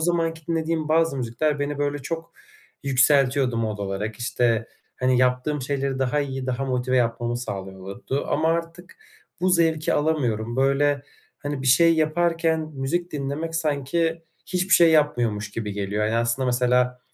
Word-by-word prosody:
zamanki 165 -1 -1
dinlediğim 160 -1 -1
bazı 160 -2 +2
müzikler 130 +5 -1
beni 145 0 -2
böyle 145 0 -1
çok 165 +4 -6 0.5
yükseltiyordu 135 -2 +3
mod 110 -2 -2
olarak. 100 +2 -3
İşte, 120 -1 0 0.3
hani, 125 0 +2
yaptığım 130 +3 +1
şeyleri 135 0 -2
daha 135 +3 +1
iyi, 135 -2 -4
daha 130 +1 -2
motive 130 -1 0
yapmamı 120 0 0
sağlıyordu 100 +4 -5
ama 160 +2 +1
artık 170 +2 -3 0.4
bu 185 - +2
zevki 165 -3 +2
alamıyorum. 125 -7 0
Böyle, 140 +1 +2 0.4
hani, 145 -2 -4
bir - - -3
şey 165 +6 +6
yaparken 165 +1 +1
müzik 170 +7 -2
dinlemek 150 +3 -3
sanki 165 +2 -1 0.2
hiçbir 185 +1 +2
şey 170 -2 +6
yapmıyormuş 120 -9 +1
gibi 105 -1 -4
geliyor. 100 +1 -2
Ya, 110 - 0
hani 115 - 0
aslında 120 +3 0
mesela 125 0 +1
140 Hz, 145 wpm, -24 LUFS, 125-160 Hz, 0.5 s, şey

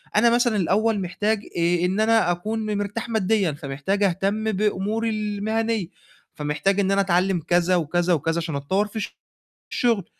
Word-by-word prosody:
أنا 235 +2 +5
مثلًا 240 -2 +2
الأول 205 +3 +1
محتاج 205 +4 -1 0.2
آآ 170 +1 +2
إن 190 +4 0
أنا 220 -4 +3
أكون 215 +5 -3
م 210 -1 -1
مرتاح 205 +3 -4
مادّيًا، 210 -4 +1
فمحتاج 150 +7 -2
أهتم 200 +4 0
بأموري 210 +2 0
المهنية، 215 -1 -1 0.5
فمحتاج 150 +7 0
إن 195 -1 +2
أنا 200 0 +3
أتعلِّم 185 -1 +1
كذا 175 +1 +3
وكذا 175 +2 +1
وكذا 165 +1 0
عشان 160 -3 -3
أتطوّر 190 +9 0
في 215 0 -4 0.6
الشُغل، 230 -7 +1
200 Hz, 155 wpm, -23 LUFS, 175-220 Hz, 0.6 s, أنا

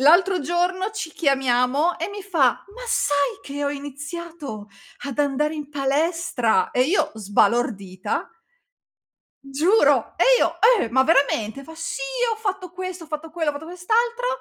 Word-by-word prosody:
L'altro 355 +6 +5
giorno 355 +6 0
ci 415 -7 -5
chiamiamo 270 +2 +1
e 335 - -2
mi 405 0 -7
fa: 335 -10 +3 0.3
"Ma - - -10
sai 285 - +1
che 285 +1 -4
ho 285 - 0
iniziato 285 -4 -7 0.4
ad 275 - -6
andare 290 +2 +1
in 295 -2 -7
palestra?" 285 - +1
E 250 - +3
io 310 +1 +1
sbalordita. 205 -2 0 1.1
Giuro! 300 +10 +2
E - - +3
io: 335 - +1 0.2
"Eh! - - -1
Ma 260 +2 +4
veramente?" 275 -5 +1
Fa: 320 - -11
"Sì, 330 +9 -4 0.3
ho - - -3
fatto 385 -5 -4
questo, 370 -1 -6
ho - - -15
fatto 310 +1 -5
quello, 320 -2 -1
ho - - -8
fatto 300 +3 -8
quest'altro". 460 +8 0
300 Hz, 150 wpm, -23 LUFS, 270-350 Hz, 1.1 s, L'altro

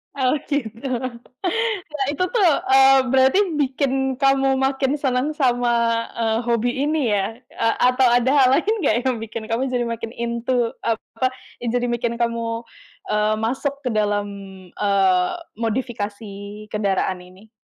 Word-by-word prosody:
oh 260 -1 +2
gitu! 255 -2 -3 1.0
Ya 295 -2 -2
itu 330 +5 -1
tuh, 395 -9 +4 0.2
eee, 270 0 +7
berarti 265 +8 +4 0.2
bikin 265 -1 0
kamu 270 0 +3
makin 270 +1 +1
seneng 265 +2 0
sama, 240 -4 +1
eee, 225 -1 0
hobi 235 0 +1 0.2
ini 300 -6 +1
ya. 205 +2 0 0.2
Eee, 225 0 0
atau 250 +1 +4
ada 245 +2 +3
hal 275 -3 +5
lain 410 +8 +1
nggak 220 - +3
yang 255 - +1
bikin 225 0 -6
kamu 245 +4 0
jadi 245 -1 0
makin 230 -1 -4
into, 235 0 -1
apa, 230 +3 -1 0.3
yang 235 -1 -2
jadi 245 0 +1
bikin 235 0 -1
kamu, 230 0 -1 0.5
eee, 210 0 +2
masuk 265 +5 -1
ke 250 - -1
dalam, 205 -1 0 0.4
eee, 190 -3 +2 0.3
modifikasi 220 -3 -3 0.4
kendaraan 195 -3 0
ini? 185 +4 -17
240 Hz, 140 wpm, -22 LUFS, 225-265 Hz, 1.0 s, eee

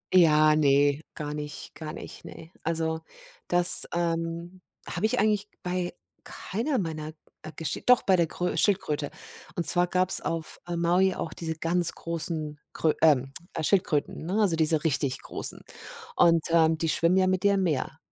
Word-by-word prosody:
Ja, 155 -3 +5
ne, 145 0 +2
gar 150 -1 -5
nicht, 150 0 -7
gar 155 -1 -7
nicht, - - -10
ne. 165 +1 -12
Also, 160 0 -2 0.5
das, 175 0 +7
ähm, 170 +1 -3 0.3
habe 195 +5 -1
ich - - -1
eigentlich 210 0 0
bei 180 -1 -3 0.3
keiner 250 +8 -4
meiner, 155 -3 -4 0.3
äh, 155 - -9
gesch 165 - -4
doch 250 -1 +5
bei 190 - +3
der 170 -2 +1
grö 180 +2 -3
Schildkröte. 150 -8 0 0.5
Und 170 - -2
zwar 175 0 +2
gab's 185 +1 +1
auf 165 -1 -4
Maui 175 +2 +1
auch 160 - -5
diese 160 -1 -5
ganz 170 +1 0
großen 155 -2 -4
Krö 155 -2 +1
ähm, 135 -4 +3 0.2
äh, 160 - -3
Schildkröten, 160 -4 0
ne, 200 +4 -1
also, 195 -6 +2
diese 160 -1 +2
richtig 140 -4 0
großen. - - +2 0.5
Und, 165 -2 +4
ähm, 160 -1 +3
die 165 0 -2
schwimmen 170 +4 +2
ja 185 - +3
mit 185 -1 0
dir 200 0 +3
im 190 - 0
Meer. 150 -7 -2
165 Hz, 165 wpm, -26 LUFS, 155-180 Hz, 0.5 s, das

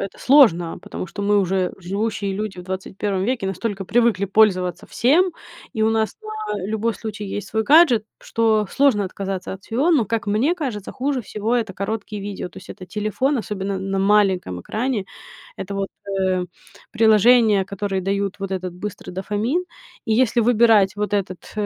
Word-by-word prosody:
это 195 - -6
сложно, 215 - +4
потому - - -6
что 205 - -8
мы, 205 0 +3
уже 190 -1 0
живущие 200 +2 -2
люди 205 -1 -4
в 180 - -6
21 190 +1 -3
веке, 240 -3 -1
настолько 195 0 -3
привыкли 230 -2 +2
пользоваться 185 -4 +2
всем, 335 - +2 0.4
и 220 - 0
у 220 - +3
нас 220 -1 0
на 430 - -4
любой 220 +2 -1
случай 215 -2 -6
есть 200 +1 -5
свой 220 0 0
гаджет, 275 -7 +5 0.2
что 220 -2 +1
сложно 265 -8 +3
отказаться 190 0 -5
от 195 0 -9
всего. 265 +9 0
Но, 290 -9 +4
как 225 -1 -2
мне 225 +11 +2
кажется, 250 - -4
хуже 270 0 -1
всего- 215 +1 -2
это 220 -5 -2
короткие 210 0 -4
видео. 200 -2 -5
То - - -22
есть - - -12
это 185 - -10
телефон, 215 +8 -1
особенно 200 -3 -3
на 195 +1 -2
маленьком 195 - +2
экране, 225 - -2 0.5
это 200 +1 -6
вот, 195 0 -2 0.3
э, 185 -1 0 0.4
приложения, 220 -2 +5
которые 200 -1 -3
дают 200 +1 -2
вот 195 -1 -5
этот 185 -1 -3
быстрый 205 +2 -7
дофамин, 210 - -1 0.4
и 220 - +1
если 240 0 +3
выбирать 220 -4 +4
вот 210 0 -2
этот, 190 -3 -3
210 Hz, 170 wpm, -21 LUFS, 195-230 Hz, 0.5 s, гаджет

